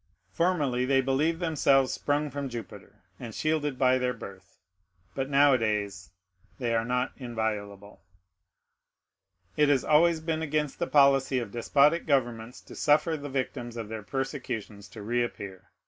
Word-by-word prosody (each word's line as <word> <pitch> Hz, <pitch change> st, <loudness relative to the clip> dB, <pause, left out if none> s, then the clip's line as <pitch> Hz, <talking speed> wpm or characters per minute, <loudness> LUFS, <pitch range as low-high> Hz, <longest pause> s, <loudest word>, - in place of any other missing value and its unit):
Formerly 145 Hz, -, +1 dB
they 135 Hz, +1 st, +3 dB
believed 140 Hz, +5 st, +1 dB
themselves 140 Hz, -6 st, +2 dB
sprung 145 Hz, 0 st, -1 dB
from 140 Hz, 0 st, -4 dB
Jupiter, 115 Hz, -4 st, -10 dB, 0.2 s
and 115 Hz, -3 st, -8 dB
shielded 150 Hz, -3 st, -1 dB
by 130 Hz, 0 st, +3 dB
their 125 Hz, 0 st, -1 dB
birth; 95 Hz, -4 st, -12 dB, 0.6 s
but 135 Hz, 0 st, -3 dB
nowadays 110 Hz, -10 st, +2 dB, 0.5 s
they 120 Hz, -2 st, -1 dB
are 115 Hz, 0 st, +1 dB
not 125 Hz, +2 st, -1 dB
inviolable. 105 Hz, -5 st, -5 dB, 1.5 s
It 150 Hz, -1 st, +3 dB
has 140 Hz, -3 st, +3 dB
always 165 Hz, +2 st, +4 dB
been 160 Hz, 0 st, -2 dB
against 150 Hz, -2 st, -2 dB
the 170 Hz, -, -1 dB
policy 135 Hz, -2 st, +4 dB
of 115 Hz, -5 st, -3 dB
despotic 145 Hz, +8 st, +2 dB
governments 120 Hz, -4 st, -1 dB
to -, -, -13 dB
suffer 155 Hz, +2 st, +2 dB
the 145 Hz, -1 st, -7 dB
victims 130 Hz, -3 st, -4 dB
of 110 Hz, -2 st, -5 dB
their 110 Hz, -1 st, -5 dB
persecutions 120 Hz, -5 st, -5 dB
to 105 Hz, +2 st, -10 dB
reappear. 105 Hz, -5 st, -3 dB
130 Hz, 140 wpm, -28 LUFS, 115-145 Hz, 1.5 s, always